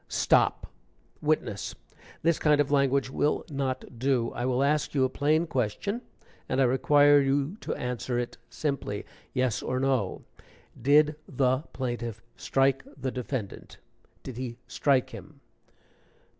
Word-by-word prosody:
"Stop! -, -, +2 dB, 0.6 s
Witness, 150 Hz, -9 st, -1 dB, 0.5 s
this 165 Hz, 0 st, +3 dB
kind 150 Hz, -1 st, +3 dB
of 145 Hz, -1 st, +2 dB
language 140 Hz, -1 st, +2 dB
will 145 Hz, +2 st, 0 dB
not 130 Hz, -3 st, -3 dB
do. 130 Hz, -2 st, +1 dB
I 120 Hz, -, -2 dB
will 130 Hz, +1 st, +2 dB
ask 150 Hz, +1 st, +1 dB
you 135 Hz, -, +3 dB
a 130 Hz, -, +2 dB
plain 155 Hz, +5 st, +2 dB
question, 160 Hz, -, -2 dB, 0.5 s
and 130 Hz, -, 0 dB
I -, -, +5 dB
require 145 Hz, +3 st, +5 dB
you 140 Hz, +5 st, 0 dB
to -, -, -4 dB
answer 125 Hz, 0 st, -3 dB
it 120 Hz, 0 st, -3 dB
simply, 140 Hz, -9 st, -3 dB, 0.3 s
yes 125 Hz, -4 st, 0 dB
or 130 Hz, -, -2 dB
no. 130 Hz, -7 st, 0 dB, 0.6 s
Did 150 Hz, +3 st, +4 dB
the 130 Hz, -1 st, +2 dB
plaintiff 120 Hz, -4 st, -4 dB, 0.2 s
strike 135 Hz, 0 st, +1 dB
the 130 Hz, -1 st, -3 dB
defendant? 125 Hz, -4 st, -5 dB, 0.5 s
Did 130 Hz, -3 st, -7 dB
he 125 Hz, -2 st, -5 dB
strike 130 Hz, +2 st, +1 dB
him?" -, -, -11 dB
135 Hz, 135 wpm, -28 LUFS, 125-145 Hz, 0.6 s, I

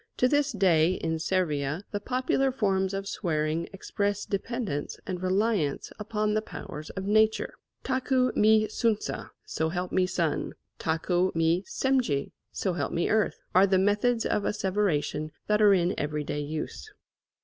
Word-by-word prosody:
To 250 Hz, -, +4 dB
this 290 Hz, +1 st, +2 dB
day 180 Hz, -5 st, +3 dB
in 160 Hz, -3 st, -2 dB
Servia 160 Hz, -2 st, 0 dB
the 205 Hz, -, -2 dB
popular 255 Hz, +4 st, 0 dB
forms 195 Hz, -6 st, +1 dB
of 195 Hz, 0 st, -4 dB
swearing 160 Hz, -4 st, -1 dB
express 200 Hz, +1 st, -2 dB
dependence 200 Hz, -, -3 dB
and 180 Hz, -2 st, -4 dB
reliance 185 Hz, -5 st, 0 dB
upon 210 Hz, 0 st, -1 dB
the 215 Hz, -, +1 dB
powers 155 Hz, -7 st, -8 dB
of 190 Hz, -, -5 dB
nature. 215 Hz, +2 st, +2 dB, 0.3 s
Taku 260 Hz, -1 st, +1 dB
mi 215 Hz, 0 st, +5 dB
Suntza, 215 Hz, 0 st, -1 dB, 0.2 s
So 160 Hz, 0 st, -1 dB
help 180 Hz, +2 st, -3 dB
me 185 Hz, -1 st, +2 dB
sun; 170 Hz, -4 st, -1 dB, 0.3 s
Taku 175 Hz, +3 st, +1 dB
mi 165 Hz, +2 st, +2 dB
Semlje, 255 Hz, -, 0 dB, 0.2 s
So 190 Hz, -, -1 dB
help 150 Hz, -5 st, -2 dB
me 170 Hz, -, 0 dB
earth, 215 Hz, -1 st, +2 dB, 0.2 s
are 190 Hz, +2 st, +6 dB
the 190 Hz, -1 st, +3 dB
methods 210 Hz, +5 st, +2 dB
of -, -, +1 dB
asseveration 185 Hz, -7 st, 0 dB, 0.2 s
that 210 Hz, 0 st, +2 dB
are 210 Hz, -1 st, +7 dB
in 175 Hz, 0 st, +1 dB
every 150 Hz, 0 st, -2 dB
day 145 Hz, 0 st, -3 dB
use. 155 Hz, -, -5 dB
190 Hz, 150 wpm, -28 LUFS, 165-215 Hz, 0.3 s, are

